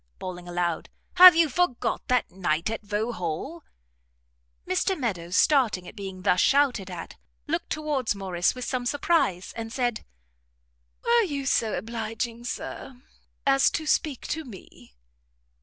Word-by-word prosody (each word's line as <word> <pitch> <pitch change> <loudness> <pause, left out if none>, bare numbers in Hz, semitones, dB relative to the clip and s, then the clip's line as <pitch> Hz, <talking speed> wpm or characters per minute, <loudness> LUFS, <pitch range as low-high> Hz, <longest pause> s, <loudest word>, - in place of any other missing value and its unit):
bawling 180 -1 -7
aloud, 175 -2 -2 0.3
"have 365 -1 +11
you 330 -1 +4
forgot 315 -3 -1
that 250 -1 +1
night 175 0 -1
at 225 - -4
Vauxhall?" 210 - -4 1.0
Mr 380 - 0
Meadows, 180 -8 -3
starting 230 - +3
at - - -11
being 190 -3 -7
thus 180 -2 +3
shouted 265 -9 +2
at, 175 -2 -8 0.3
looked - - -2
towards 295 -8 -1
Morrice 185 -1 0
with 250 -1 -5
some 250 -2 -2
surprise, 285 - 0
and 225 -1 -6
said, 240 -3 -1 1.0
"Were 470 0 +5
you 285 -5 -4
so 225 -5 +1
obliging, 230 +2 -4
Sir, 250 +1 -6 0.5
as 275 0 +4
to 315 - -3
speak 300 -3 0
to 320 +1 -2
me?" 195 - -14
230 Hz, 135 wpm, -26 LUFS, 185-280 Hz, 1.0 s, have